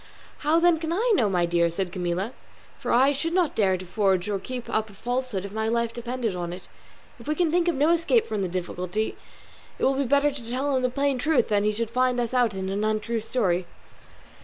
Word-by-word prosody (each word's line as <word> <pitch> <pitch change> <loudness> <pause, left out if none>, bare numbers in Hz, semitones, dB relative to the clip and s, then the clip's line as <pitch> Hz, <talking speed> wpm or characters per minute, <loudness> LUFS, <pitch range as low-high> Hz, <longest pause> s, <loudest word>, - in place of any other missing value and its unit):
"How 310 +3 +3
then 340 -1 +4
can 325 0 -3
I 450 +8 +1
know, 230 - +3
my 180 -2 +2
dear?" 170 0 +2
said 180 +2 -3
Camilla, 180 +5 -2 0.5
"for - - -3
I 265 +4 +5
should 305 +4 -2
not 355 -4 +2
dare 190 -4 +2
to 185 - -8
forge 190 -1 +1
or 205 -2 -1
keep 250 +4 -6
up 220 0 -1
a - - -14
falsehood 245 -2 -2
if 200 - -7
my 220 +1 -2
life 235 0 0
depended 240 -3 -3
on 175 -1 -4
it. 180 +1 -9 0.5
If - - -13
we 305 - 0
can 335 -1 +1
think 350 +1 +2
of 345 - +2
no 290 +4 +3
escape 340 +7 +3
from 215 -2 -3
this 185 - -1
difficulty, 180 +3 -3 0.6
it - - -6
will 270 - +4
be 275 +1 0
better 285 +3 +3
to 245 -5 -9
tell 270 +3 0
him 260 - +1
the 250 - +1
plain 275 0 0
truth 270 -4 +2
than 205 -1 +3
that 210 - +1
he - - -1
should 230 0 -2
find 255 0 +2
us 240 0 -2
out 240 -5 +2
in 190 0 -3
an 200 +2 -1
untrue 215 +1 0
story." 185 -6 0
235 Hz, 240 wpm, -25 LUFS, 195-275 Hz, 0.6 s, I